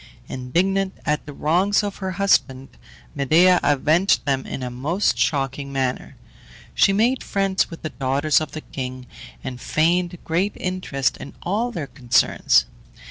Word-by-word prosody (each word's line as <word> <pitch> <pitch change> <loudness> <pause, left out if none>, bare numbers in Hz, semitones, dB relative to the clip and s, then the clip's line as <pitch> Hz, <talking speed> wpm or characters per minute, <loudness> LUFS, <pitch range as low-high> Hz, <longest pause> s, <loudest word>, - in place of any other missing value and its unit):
Indignant 190 +10 -1
at 150 -1 -1
the - - -6
wrongs 180 +9 +2
of 205 -1 -4
her 190 -1 -4
husband, 135 -9 +1 0.4
Medea 165 +6 +4
avenged 155 +6 +2
them 135 -2 -1
in 130 - -5
a 125 - -4
most 150 +11 0
shocking 140 -1 -1
manner. 130 -2 -2 0.6
She - - +4
made 230 +6 +1
friends 195 -1 0
with 165 - -10
the 155 - -2
daughters 140 +3 +1
of 155 - -5
the 155 - -5
king, 130 -2 -6 0.4
and 125 -1 -6
feigned 175 +3 +1
great 180 +5 0
interest 180 -8 -2
in - - -10
all 220 +7 -1
their 165 -9 -4
concerns. 120 -4 +2
155 Hz, 145 wpm, -22 LUFS, 135-190 Hz, 0.6 s, Medea